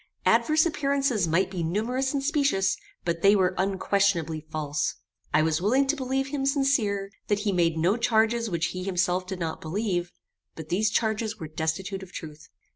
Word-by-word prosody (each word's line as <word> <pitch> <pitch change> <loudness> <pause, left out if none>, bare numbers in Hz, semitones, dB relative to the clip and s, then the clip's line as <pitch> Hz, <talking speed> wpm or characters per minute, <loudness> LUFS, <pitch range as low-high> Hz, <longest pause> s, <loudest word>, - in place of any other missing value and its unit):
Adverse 310 +1 +4
appearances 275 - +1
might 185 +4 +1
be 180 -3 -3
numerous 230 +10 -1
and 280 -2 -2
specious, 280 -9 +2 0.3
but 170 -1 -1
they 200 +2 +6
were 185 -2 +2
unquestionably 190 -4 +1
false. 150 -1 -2 0.4
I 155 +1 +4
was 160 +1 +1
willing 255 +8 +3
to 275 +3 +1
believe 270 0 -2
him 280 -1 -2
sincere, 235 -9 +1 0.2
that 205 -1 +1
he 210 -1 0
made 170 -3 +1
no 180 +7 +2
charges 230 0 +2
which 170 -2 -1
he 185 0 -4
himself 185 -1 0
did 190 -1 -4
not 165 -2 -4
believe; 175 0 -2 0.4
but 160 -1 -9
these 205 +4 +2
charges 220 0 -1
were 160 - -5
destitute 165 +5 -3
of 190 -1 -11
truth. 155 -3 -9
195 Hz, 175 wpm, -26 LUFS, 170-235 Hz, 0.4 s, they